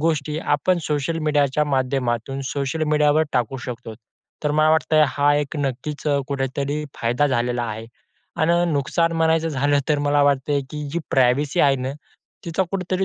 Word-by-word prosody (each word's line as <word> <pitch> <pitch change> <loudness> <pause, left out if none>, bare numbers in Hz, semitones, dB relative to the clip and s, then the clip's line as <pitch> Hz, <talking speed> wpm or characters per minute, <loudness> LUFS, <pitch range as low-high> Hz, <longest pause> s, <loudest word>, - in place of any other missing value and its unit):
गोष्टी 155 -1 0
आपण 170 +4 +1
सोशल 150 +2 -1
मीडियाच्या 150 -1 +1
माध्यमातून 130 -2 -1
सोशल 145 +3 -2
मीडियावर 150 0 +3
टाकू 125 +1 0
शकतो. 115 -2 -7 0.5
तर 150 - +2
मला 155 +1 +3
वाटतं 160 0 +2
आहे, 155 - +7
हा 145 0 +2
एक 145 +1 -2
नक्कीच 140 +2 -3 0.3
कुठेतरी 140 +2 -2 0.2
फायदा 120 +5 +2
झालेला 120 -2 0
आहे. 110 0 -6 0.5
आणि 170 +2 +2
नुकसान 165 +4 +1
म्हणायचं 165 0 +2
झालं 145 0 +1
तर 150 -1 +2
मला 145 0 +2
वाटते, 140 0 +2
की 150 -1 -5
जी 170 - 0
प्रायव्हसी 135 +2 +2
आहे 140 -1 +4
ना, 130 +1 -3 0.5
तिचा 170 +3 0
कुठेतरी 185 0 -1
145 Hz, 155 wpm, -22 LUFS, 135-155 Hz, 0.5 s, आहे